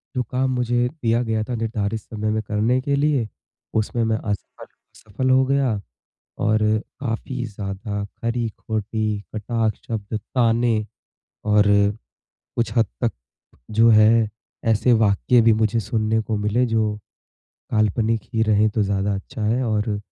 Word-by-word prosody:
जो 125 Hz, -, +1 dB
काम 130 Hz, +1 st, +1 dB
मुझे 120 Hz, 0 st, +1 dB
दिया 120 Hz, -7 st, 0 dB
गया 110 Hz, -1 st, -1 dB
था 125 Hz, -, -4 dB
निर्धारित 110 Hz, -1 st, -2 dB
समय 110 Hz, 0 st, -4 dB
में 110 Hz, 0 st, 0 dB
करने 115 Hz, +4 st, +1 dB
के 140 Hz, +1 st, 0 dB
लिए, 140 Hz, -5 st, +1 dB, 0.5 s
उसमें 110 Hz, +2 st, 0 dB
मैं 110 Hz, 0 st, +1 dB
असफल 105 Hz, -3 st, -5 dB
असफल 125 Hz, +6 st, -5 dB
हो 130 Hz, 0 st, +5 dB
गया। 130 Hz, -6 st, +1 dB, 0.6 s
और 110 Hz, -1 st, +3 dB, 0.4 s
काफ़ी 125 Hz, 0 st, -3 dB
ज़्यादा 100 Hz, 0 st, -5 dB
खरी-खोटी, 110 Hz, -2 st, -3 dB
कटाक्ष 110 Hz, +1 st, -1 dB
शब्द 110 Hz, -2 st, -4 dB, 0.2 s
ताने 115 Hz, -1 st, +3 dB, 0.7 s
और 105 Hz, 0 st, +5 dB, 0.9 s
कुछ 115 Hz, -2 st, 0 dB
हद 115 Hz, -, +5 dB, 0.2 s
तक 120 Hz, -, +2 dB, 0.7 s
जो 115 Hz, +1 st, +7 dB
है 110 Hz, 0 st, +5 dB, 0.4 s
ऐसे 110 Hz, +3 st, +3 dB
वाक्य 110 Hz, +3 st, +4 dB
भी 115 Hz, 0 st, +5 dB
मुझे 110 Hz, +1 st, +1 dB
सुनने 110 Hz, +1 st, 0 dB
को 110 Hz, -1 st, -2 dB
मिले 105 Hz, +4 st, +1 dB
जो 110 Hz, -2 st, 0 dB, 0.8 s
काल्पनिक 110 Hz, +1 st, +1 dB
ही 110 Hz, -, +2 dB
रहे 110 Hz, 0 st, +3 dB
तो 110 Hz, 0 st, 0 dB
ज़्यादा 100 Hz, 0 st, 0 dB
अच्छा 110 Hz, +5 st, -6 dB
है। 115 Hz, +4 st, +1 dB
और 105 Hz, -2 st, 0 dB
110 Hz, 140 wpm, -22 LUFS, 105-120 Hz, 0.9 s, जो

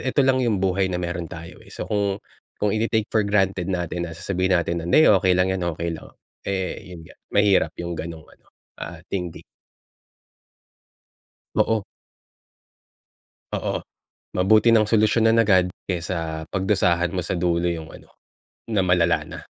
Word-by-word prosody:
eto 140 Hz, 0 st, +3 dB
lang 130 Hz, -1 st, +3 dB
yung 105 Hz, -6 st, +1 dB
buhay 95 Hz, 0 st, +1 dB
na 90 Hz, -, -2 dB
meron 85 Hz, -2 st, -3 dB
tayo, 85 Hz, +2 st, -10 dB
eh. -, -, -17 dB
So, -, -, -5 dB
kung 100 Hz, -2 st, 0 dB, 0.4 s
kung 105 Hz, -1 st, +1 dB
ite-take 110 Hz, -1 st, 0 dB
for 110 Hz, -, +4 dB
granted 95 Hz, -3 st, +1 dB
natin 90 Hz, -1 st, -2 dB
na -, -, -8 dB
sasabihin 95 Hz, +1 st, -1 dB
natin 85 Hz, 0 st, -1 dB
na, -, -, -6 dB
"Hindi 155 Hz, -, +6 dB
okey 95 Hz, -2 st, +5 dB
lang 90 Hz, +1 st, +3 dB
yan, 90 Hz, -2 st, -2 dB
okey 85 Hz, 0 st, -2 dB
lang." -, -, -8 dB, 0.4 s
Eh, 95 Hz, -1 st, -3 dB
yun 85 Hz, -, -9 dB
nga, 85 Hz, -, -15 dB, 0.2 s
mahirap 100 Hz, -2 st, +3 dB
yung 85 Hz, 0 st, -4 dB
gano'ng 80 Hz, -1 st, -6 dB
ano, -, -, -23 dB, 0.3 s
ah, -, -, -6 dB
thinking. 90 Hz, -4 st, -4 dB, 2.1 s
Oo. 110 Hz, -3 st, +2 dB, 1.7 s
Oo. -, -, -2 dB, 0.6 s
Mabuti 110 Hz, +5 st, +5 dB
nang 110 Hz, -2 st, +4 dB
solusyon 110 Hz, +1 st, +3 dB
agad, 95 Hz, -5 st, +4 dB, 0.2 s
kaysa 80 Hz, -3 st, -3 dB
pagdusahan 90 Hz, -3 st, +2 dB
mo 95 Hz, -, -2 dB
sa -, -, -2 dB
dulo 85 Hz, 0 st, +1 dB
yung 80 Hz, -2 st, -3 dB
ano -, -, -15 dB, 0.6 s
na 105 Hz, -3 st, +2 dB
malala 85 Hz, -3 st, +3 dB
na. -, -, -8 dB
95 Hz, 155 wpm, -23 LUFS, 85-105 Hz, 2.1 s, Hindi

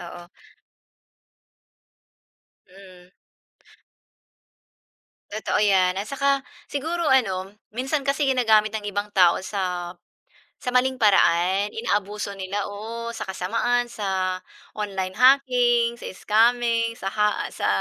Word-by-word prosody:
Oo. 175 Hz, 0 st, -9 dB, 2.4 s
Hmm. 185 Hz, -1 st, -16 dB, 2.2 s
Totoo 215 Hz, +1 st, -1 dB
'yan 190 Hz, -3 st, +3 dB
at 205 Hz, -, -6 dB
saka 275 Hz, 0 st, +1 dB, 0.3 s
siguro 330 Hz, +5 st, -2 dB
ano, 195 Hz, -, +1 dB, 0.2 s
minsan 270 Hz, +4 st, -1 dB
kasi 280 Hz, +1 st, 0 dB
ginagamit 220 Hz, -5 st, +3 dB
ng 215 Hz, -1 st, -4 dB
ibang 205 Hz, +1 st, -4 dB
tao 180 Hz, -3 st, +5 dB
sa 180 Hz, -3 st, -3 dB, 0.7 s
sa 250 Hz, -, -4 dB
maling 260 Hz, +1 st, +2 dB
paraan. 190 Hz, -1 st, +3 dB
Inaabuso 205 Hz, -2 st, -2 dB
nila, 195 Hz, +1 st, -3 dB
oo. 230 Hz, +3 st, -6 dB
Sa -, -, -8 dB
kasamaan, 230 Hz, +6 st, 0 dB
sa 190 Hz, -4 st, -2 dB, 0.3 s
online 195 Hz, -3 st, -3 dB
hacking, 245 Hz, -3 st, +4 dB
sa -, -, -14 dB
scamming, 230 Hz, +3 st, +1 dB
sa 195 Hz, -, -5 dB
ha 210 Hz, +1 st, 0 dB
sa -, -, -3 dB
210 Hz, 105 wpm, -24 LUFS, 190-245 Hz, 2.4 s, tao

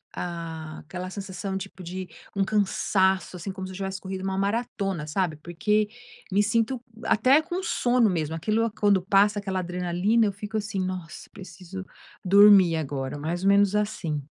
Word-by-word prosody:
ah, 165 Hz, -3 st, -5 dB
aquela 180 Hz, +3 st, -7 dB
sensação 195 Hz, 0 st, -5 dB
tipo 190 Hz, -1 st, -8 dB
de 185 Hz, +2 st, -5 dB, 0.3 s
um 200 Hz, -, +2 dB
cansaço, 190 Hz, -2 st, +1 dB
assim 180 Hz, +3 st, -5 dB
como 190 Hz, -1 st, -6 dB
se 185 Hz, -, -8 dB
eu -, -, -9 dB
tivesse 195 Hz, 0 st, -4 dB
corrido 190 Hz, 0 st, -5 dB
uma 190 Hz, 0 st, -2 dB
maratona, 200 Hz, -4 st, -1 dB
sabe 160 Hz, +1 st, -1 dB
porque 205 Hz, +7 st, 0 dB, 0.4 s
me 200 Hz, -, +4 dB
sinto 230 Hz, +4 st, +1 dB, 0.2 s
até 255 Hz, +6 st, +4 dB
com 350 Hz, +3 st, -4 dB
sono 245 Hz, -, +2 dB
mesmo, 160 Hz, -3 st, -1 dB
aquilo 215 Hz, +7 st, 0 dB
quando 205 Hz, -2 st, +4 dB
passa 200 Hz, +2 st, +3 dB
aquela 190 Hz, -2 st, -2 dB
adrenalina, 180 Hz, +5 st, +1 dB
eu 205 Hz, -, +1 dB
fico, 210 Hz, +3 st, -5 dB
assim: 205 Hz, -2 st, -3 dB
"Nossa, 185 Hz, -3 st, -6 dB
preciso 185 Hz, 0 st, -9 dB, 0.4 s
dormir 195 Hz, -3 st, +7 dB
agora". 135 Hz, -3 st, -3 dB
Mais 170 Hz, +5 st, -3 dB
ou 195 Hz, -, +4 dB
menos 200 Hz, 0 st, +4 dB
assim. 170 Hz, -9 st, -2 dB
190 Hz, 165 wpm, -26 LUFS, 175-205 Hz, 0.4 s, dormir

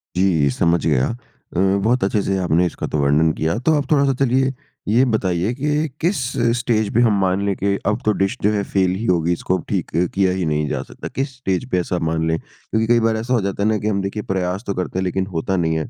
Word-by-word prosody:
जी, 90 Hz, -6 st, +3 dB
समझ 85 Hz, +5 st, +1 dB
गया। 70 Hz, -5 st, +2 dB
अ, 120 Hz, -6 st, -11 dB, 0.3 s
बहुत 120 Hz, +4 st, +2 dB
अच्छे-से 95 Hz, -1 st, 0 dB
आपने 90 Hz, -1 st, +2 dB
इसका 85 Hz, -, -4 dB
तो -, -, -2 dB
वर्णन 75 Hz, +3 st, +3 dB
किया 80 Hz, +6 st, -1 dB
तो 160 Hz, -, +4 dB
आप 140 Hz, -2 st, -3 dB
थोड़ा-सा 140 Hz, -2 st, +4 dB
चलिए 130 Hz, +1 st, +2 dB, 0.3 s
ये 115 Hz, +5 st, +4 dB
बताइए 100 Hz, -3 st, 0 dB
कि 150 Hz, +4 st, 0 dB
किस 175 Hz, +5 st, +1 dB, 0.4 s
स्टेज 110 Hz, -4 st, 0 dB
पे 120 Hz, -, +4 dB
हम 110 Hz, -4 st, +3 dB
मान 95 Hz, +1 st, +1 dB
लें 100 Hz, -1 st, 0 dB
कि 100 Hz, +1 st, 0 dB
अब 105 Hz, +3 st, 0 dB
तो 110 Hz, -, +4 dB
डिश 95 Hz, 0 st, +1 dB
जो 105 Hz, -, +4 dB
है 100 Hz, -1 st, 0 dB
फ़ेल 95 Hz, -2 st, +1 dB
ही 110 Hz, +5 st, -4 dB
होगी, 85 Hz, -4 st, +2 dB
इसको 90 Hz, +2 st, -1 dB
अब 85 Hz, -, -8 dB
ठीक -, -, -2 dB, 0.2 s
किया 95 Hz, -1 st, +2 dB
ही 95 Hz, -1 st, -1 dB
नहीं 75 Hz, -1 st, 0 dB
जा -, -, -2 dB
सकता। -, -, -9 dB
किस 135 Hz, 0 st, -2 dB
स्टेज 95 Hz, -1 st, -1 dB
पे 90 Hz, -, +2 dB
ऐसा 90 Hz, 0 st, -2 dB
मान 80 Hz, 0 st, 0 dB
लें, 80 Hz, 0 st, +1 dB
क्योंकि 110 Hz, 0 st, -4 dB
कई 120 Hz, 0 st, +4 dB
बार 115 Hz, -1 st, +1 dB
ऐसा 115 Hz, +3 st, -2 dB
हो 120 Hz, -, +2 dB
जाता 100 Hz, 0 st, -2 dB
है 105 Hz, -, +3 dB
ना 110 Hz, -, +2 dB
कि 105 Hz, -, -3 dB
हम 100 Hz, -2 st, 0 dB
देखिए 100 Hz, +2 st, -4 dB
प्रयास 95 Hz, +2 st, -1 dB
तो 100 Hz, -, 0 dB
करते 90 Hz, 0 st, -3 dB
हैं, -, -, 0 dB
लेकिन 95 Hz, +1 st, -1 dB
होता 95 Hz, +4 st, -1 dB
नहीं 80 Hz, -2 st, +1 dB
है। 80 Hz, -, -3 dB
95 Hz, 250 wpm, -20 LUFS, 90-115 Hz, 0.4 s, तो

